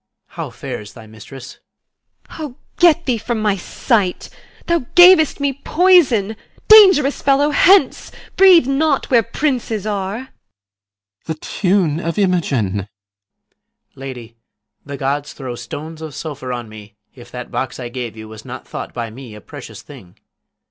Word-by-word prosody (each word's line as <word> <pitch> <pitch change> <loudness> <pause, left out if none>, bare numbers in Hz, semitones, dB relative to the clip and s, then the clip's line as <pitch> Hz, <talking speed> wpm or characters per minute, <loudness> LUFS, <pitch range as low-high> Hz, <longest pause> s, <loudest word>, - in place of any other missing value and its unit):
PISANIO. - - -23
How - - -5
fares 105 -1 -8
my 115 -3 -12
mistress? 115 +5 -12 0.7
IMOGEN. - - -11
O, 290 -5 -6 0.2
get 340 -1 +4
thee 245 -4 0
from 225 +1 -3
my 210 -2 +1
sight; 195 0 -2 0.4
Thou 340 -7 -1
gav'st 355 -4 +6
me 280 -1 0
poison. 280 - +2 0.3
Dangerous 380 -10 +6
fellow, 285 +2 +2
hence! 380 +6 +3 0.2
Breathe 370 -6 +6
not 275 +1 0
where 235 -2 +5
princes 230 -3 -3
are. 200 -2 -3
CYMBELINE. 100 - -19
The 160 - -4
tune 180 -1 -1
of 165 +2 -4
Imogen! 175 - +1
PISANIO. 100 0 -4 1.1
Lady, 125 -4 -9 0.5
The 140 -1 -8
gods 140 +1 -3
throw 130 -3 -7
stones 150 +7 -8
of 155 -4 -8
sulphur 140 -5 -6
on 120 -2 -5
me, 105 -1 -13 0.2
if 120 -2 -15
That 125 0 -9
box 130 - -4
I 120 -2 -6
gave 120 -3 -7
you 110 0 -9
was 110 -1 -12
not - - -10
thought - - -8
by 115 -2 -5
me 120 -2 -11
A - - -11
precious - - -11
thing! 90 -1 -15
165 Hz, 155 wpm, -18 LUFS, -, 1.1 s, gav'st